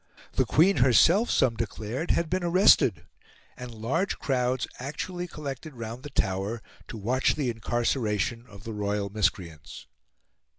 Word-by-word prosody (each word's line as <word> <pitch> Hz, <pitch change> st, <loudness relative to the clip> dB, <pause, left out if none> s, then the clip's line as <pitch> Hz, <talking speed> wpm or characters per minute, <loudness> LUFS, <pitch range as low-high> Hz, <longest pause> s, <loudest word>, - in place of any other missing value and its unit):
The -, -, +2 dB
Queen 175 Hz, +3 st, +4 dB
herself, 150 Hz, -, +5 dB
some 125 Hz, -3 st, +3 dB
declared, 115 Hz, -, -4 dB
had 170 Hz, -, +1 dB
been 185 Hz, +2 st, -1 dB
arrested, 170 Hz, -, +4 dB, 0.5 s
and 125 Hz, 0 st, -8 dB
large 115 Hz, -, -2 dB
crowds 125 Hz, -1 st, 0 dB
actually 175 Hz, +7 st, -5 dB
collected 150 Hz, -2 st, -7 dB
round 115 Hz, +1 st, -7 dB
the 145 Hz, -, -8 dB
Tower 100 Hz, -1 st, -2 dB, 0.2 s
to -, -, -7 dB
watch 125 Hz, +6 st, +1 dB
the 135 Hz, -5 st, -1 dB
incarceration 115 Hz, 0 st, -1 dB
of 100 Hz, -3 st, -14 dB
the 115 Hz, -1 st, -6 dB
royal 100 Hz, -1 st, -2 dB
miscreants. 85 Hz, -7 st, -3 dB
120 Hz, 135 wpm, -27 LUFS, 105-145 Hz, 0.5 s, herself